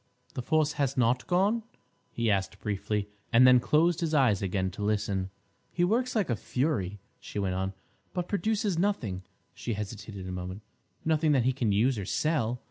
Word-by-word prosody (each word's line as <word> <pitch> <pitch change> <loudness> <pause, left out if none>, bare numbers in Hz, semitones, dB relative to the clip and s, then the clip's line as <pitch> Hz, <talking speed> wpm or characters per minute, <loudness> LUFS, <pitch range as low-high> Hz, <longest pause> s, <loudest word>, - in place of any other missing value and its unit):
The - - -3
force 155 +3 +2
has 135 -1 0
not 120 0 +2
gone?" 200 +6 +2 0.5
he 115 -2 0
asked 95 -5 -1
briefly, 105 0 -2 0.2
and 120 +2 +7
then 125 -1 +8
closed 160 +6 +3
his 160 -2 0
eyes 125 -9 +4
again 95 -1 -1
to 100 - -8
listen. 100 -2 0 0.4
"He 175 - 0
works 240 +7 +1
like 210 -6 +2
a - - +2
fury," 105 - -1 0.2
she - - -8
went 95 -2 0
on, 95 +1 -2 0.4
"but 180 -1 -3
produces 205 -2 0
nothing"—she 115 - -3
hesitated 105 -2 -6
a - - -5
moment—"nothing 110 - -2
that 130 -4 +3
he 130 - +3
can 120 -5 0
use 115 +4 +2
or 100 - -4
sell. 125 - 0
120 Hz, 170 wpm, -29 LUFS, 100-160 Hz, 0.5 s, then